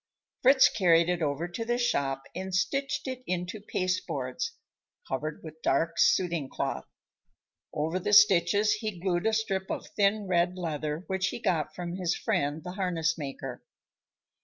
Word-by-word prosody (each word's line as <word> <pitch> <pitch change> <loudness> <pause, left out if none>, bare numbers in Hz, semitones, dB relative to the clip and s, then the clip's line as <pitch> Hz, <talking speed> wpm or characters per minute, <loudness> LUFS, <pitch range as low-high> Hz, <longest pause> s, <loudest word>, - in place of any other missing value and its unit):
Fritz 265 +1 +7
carried 170 -4 +3
it 175 -1 0
over 150 +2 -1
to 175 +6 -5
the 240 +1 0
shop 140 - 0
and 185 +1 -4
stitched 275 +9 -1
it 260 -1 -4
into 180 +3 -3
pasteboards, 185 - -2 0.5
covered 155 0 -4
with 160 0 -10
dark 165 +5 +1
suiting 170 -7 +2
cloth. - - -3 0.8
Over 160 +5 -1
the 195 - -2
stitches 205 0 +6
he 215 -3 -4
glued 180 +2 0
a 220 - +2
strip 195 -4 -1
of - - -3
thin 205 +1 +2
red 180 0 +1
leather 155 -2 -3
which 190 0 -1
he - - -3
got 165 -9 -1
from 175 0 -5
his 175 -2 0
friend, 145 +2 -1
the 180 - -5
harness 175 -4 0
maker. 135 -4 -6
180 Hz, 155 wpm, -28 LUFS, 160-200 Hz, 0.8 s, Fritz